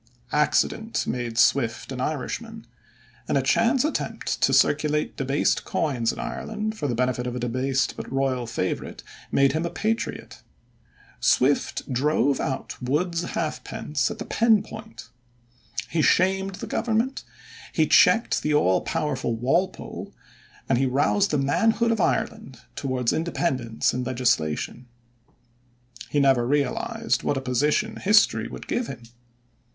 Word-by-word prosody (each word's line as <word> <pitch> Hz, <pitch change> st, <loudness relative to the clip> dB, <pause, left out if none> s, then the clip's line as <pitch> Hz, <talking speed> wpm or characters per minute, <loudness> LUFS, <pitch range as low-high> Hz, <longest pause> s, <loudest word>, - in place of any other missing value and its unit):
Accident 150 Hz, +9 st, +1 dB
made 120 Hz, -2 st, -3 dB
Swift 120 Hz, -2 st, +2 dB
an 130 Hz, -1 st, -4 dB
Irishman, 225 Hz, -, -4 dB, 0.6 s
and -, -, +1 dB
a -, -, +1 dB
chance 265 Hz, -, +3 dB
attempt 310 Hz, -, -3 dB
to -, -, +4 dB
circulate 150 Hz, 0 st, +2 dB
debased 135 Hz, +2 st, 0 dB
coins 125 Hz, -7 st, 0 dB
in -, -, -9 dB
Ireland 215 Hz, 0 st, -4 dB
for 150 Hz, -, -3 dB
the 120 Hz, -, -1 dB
benefit 125 Hz, 0 st, 0 dB
of 125 Hz, -, -4 dB
a -, -, -3 dB
debased 130 Hz, +3 st, 0 dB
but -, -, -7 dB
royal 135 Hz, -3 st, 0 dB
favorite 100 Hz, -5 st, -3 dB, 0.3 s
made 140 Hz, -1 st, +4 dB
him 160 Hz, +3 st, -1 dB
a 170 Hz, -, -1 dB
patriot. 220 Hz, +6 st, -3 dB, 0.8 s
Swift 130 Hz, -, +2 dB
drove 140 Hz, 0 st, +2 dB
out 135 Hz, 0 st, -4 dB
Wood's 165 Hz, +7 st, 0 dB
halfpence 155 Hz, -4 st, -2 dB
at -, -, -6 dB
the -, -, -6 dB
pen 225 Hz, -2 st, +3 dB
point. 220 Hz, -, -10 dB, 0.8 s
He 165 Hz, -, 0 dB
shamed 190 Hz, +4 st, +2 dB
the -, -, -6 dB
government, 235 Hz, +3 st, -1 dB, 0.5 s
he -, -, +2 dB
checked 230 Hz, +1 st, +4 dB
the 150 Hz, -1 st, +1 dB
all 95 Hz, -11 st, +3 dB
powerful 130 Hz, -6 st, -2 dB
Walpole, 135 Hz, +11 st, -2 dB, 0.5 s
and 120 Hz, -, +2 dB
he 135 Hz, -, +2 dB
roused 145 Hz, +10 st, +2 dB
the 150 Hz, -, +1 dB
manhood 225 Hz, +12 st, +2 dB
of 225 Hz, -3 st, 0 dB
Ireland 220 Hz, -, -1 dB
towards 130 Hz, -3 st, -1 dB
independence 130 Hz, -8 st, -1 dB
in 125 Hz, -, -2 dB
legislation. 120 Hz, -3 st, -1 dB, 1.2 s
He 145 Hz, -, +1 dB
never 135 Hz, -4 st, +3 dB
realized 145 Hz, +1 st, 0 dB
what 145 Hz, -, 0 dB
a -, -, -2 dB
position 150 Hz, -, 0 dB
history 210 Hz, +2 st, +3 dB
would -, -, -9 dB
give 245 Hz, -1 st, -1 dB
him. 120 Hz, -, -8 dB
145 Hz, 135 wpm, -25 LUFS, 125-195 Hz, 1.2 s, to